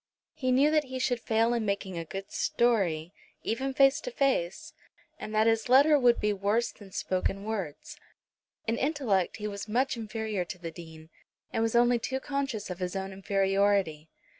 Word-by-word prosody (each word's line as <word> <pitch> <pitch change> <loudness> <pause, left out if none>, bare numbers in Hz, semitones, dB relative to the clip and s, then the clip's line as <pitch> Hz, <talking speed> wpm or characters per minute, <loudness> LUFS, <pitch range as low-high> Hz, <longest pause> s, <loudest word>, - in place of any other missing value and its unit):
He 255 -1 -1
knew 275 +4 +4
that 305 -1 +2
he 260 0 -6
should 255 -2 0
fail 225 +1 +1
in 235 -2 0
making 200 -2 -2
a 165 - -3
good 195 +4 -7
story, 185 -8 +1 0.3
even 265 +5 -1
face 270 +1 +4
to - - -5
face, 270 - -1 0.5
and - - -6
that 215 +1 +4
his 225 +1 +2
letter 285 +4 +6
would 245 -2 +4
be 210 0 +1
worse 205 +4 0
than 200 -2 -15
spoken 190 +2 -2
words. 220 - -5 0.7
In 230 +1 0
intellect 260 - 0
he 210 -1 -4
was 200 0 -6
much 255 +5 +1
inferior 220 -3 -3
to 175 - -8
the 170 -2 -6
Dean, 160 -1 -12 0.4
and - - 0
was 225 +1 0
only 240 0 +4
too 265 +3 -2
conscious 270 -8 -3
of 180 - -6
his 180 0 -3
own 195 0 -4
inferiority. 195 -4 +1
220 Hz, 180 wpm, -29 LUFS, 195-255 Hz, 0.7 s, letter